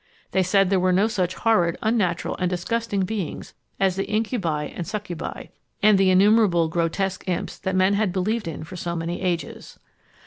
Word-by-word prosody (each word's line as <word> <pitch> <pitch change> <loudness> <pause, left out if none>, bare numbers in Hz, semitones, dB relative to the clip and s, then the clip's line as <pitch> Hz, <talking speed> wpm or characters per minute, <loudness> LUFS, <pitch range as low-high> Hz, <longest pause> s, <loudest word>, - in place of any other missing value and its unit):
They 190 - +2
said 195 +1 +2
there 195 - +3
were 185 0 +2
no 195 +4 +3
such 185 -5 -1
horrid, 175 -7 +2
unnatural, 205 -7 0
and 180 -1 0
disgusting 200 +3 -1
beings 190 -2 -4 0.3
as 190 -2 +2
the 195 - -2
incubi 210 -9 -1
and 170 +3 -6
succubi, 205 -5 -5 0.3
and 210 -2 +6
the 195 -1 +4
innumerable 190 -3 +4
grotesque 175 +4 -1
imps 180 - -3
that 190 -1 -2
men 185 +1 +3
had 205 -2 +1
believed 205 +4 -1
in 160 -1 -5
for 165 +4 -9
so 170 0 -3
many 170 +1 -3
ages. 175 -3 -3
185 Hz, 175 wpm, -23 LUFS, 175-205 Hz, 0.3 s, and